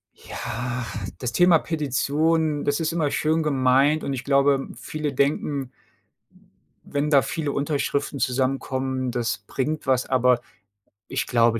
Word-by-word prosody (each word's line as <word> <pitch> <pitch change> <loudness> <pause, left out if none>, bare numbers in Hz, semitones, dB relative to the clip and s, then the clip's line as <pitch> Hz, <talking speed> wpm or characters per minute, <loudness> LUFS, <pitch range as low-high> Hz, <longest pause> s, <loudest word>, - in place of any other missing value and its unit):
Ja, 125 +1 -5 0.3
das 125 -2 -3
Thema 175 +3 +5
Petition, 155 +1 0
das 145 +2 0
ist 160 0 0
immer 160 -4 0
schön 160 +3 +1
gemeint 140 +1 +3
und 140 - -2
ich 130 -2 -4
glaube, 140 -1 +3
viele 150 -1 -4
denken, 140 -1 0 0.6
w - - -25
wenn 145 +1 0
da 140 -3 +6
viele 150 -3 -3
Unterschriften 140 0 -1
zusammenkommen, 130 0 -1
das 120 0 -1
bringt 150 +2 -2
was, 130 -1 +2
aber 125 -1 +3 0.7
ich - - -1
glaube, 115 -1 +3
140 Hz, 135 wpm, -24 LUFS, 130-150 Hz, 0.7 s, da